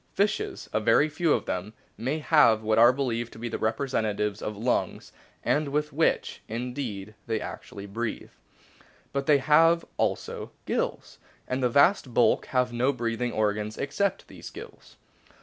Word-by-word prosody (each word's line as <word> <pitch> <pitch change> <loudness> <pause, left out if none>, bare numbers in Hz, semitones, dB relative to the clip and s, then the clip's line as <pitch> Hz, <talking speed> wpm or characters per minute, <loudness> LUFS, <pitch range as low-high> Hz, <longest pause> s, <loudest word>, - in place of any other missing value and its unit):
Fishes 210 +2 -1
a - - +2
very 115 +7 +4
few 155 +1 0
of - - +1
them 90 +4 -4 0.2
may 130 +8 -2
have 150 -8 +4
what 110 0 +2
are 120 +1 +8
believed 120 -3 -2
to - - -12
be 120 +1 -4
the - - -4
representatives 110 -3 -1
of 105 -1 -4
lungs, 120 +4 -1 0.3
and 150 0 +1
with 150 +1 -1
which, 160 +3 0
indeed, 115 -3 -5
they 110 -1 0
actually 100 -1 -8
breathe; 115 +3 -4 0.8
but 140 0 -2
they 150 -2 +6
have 165 +5 +4
also - - -2 0.2
gills, - - -3 0.3
and 130 +1 -2
the 125 - +2
vast 140 - +3
bulk 120 - +3
have 125 -1 0
no 125 +3 +2
breathing 120 -1 -2
organs 105 0 -1
except 145 +9 -1
these - - -10
gills. - - -12
120 Hz, 155 wpm, -27 LUFS, 110-140 Hz, 0.8 s, are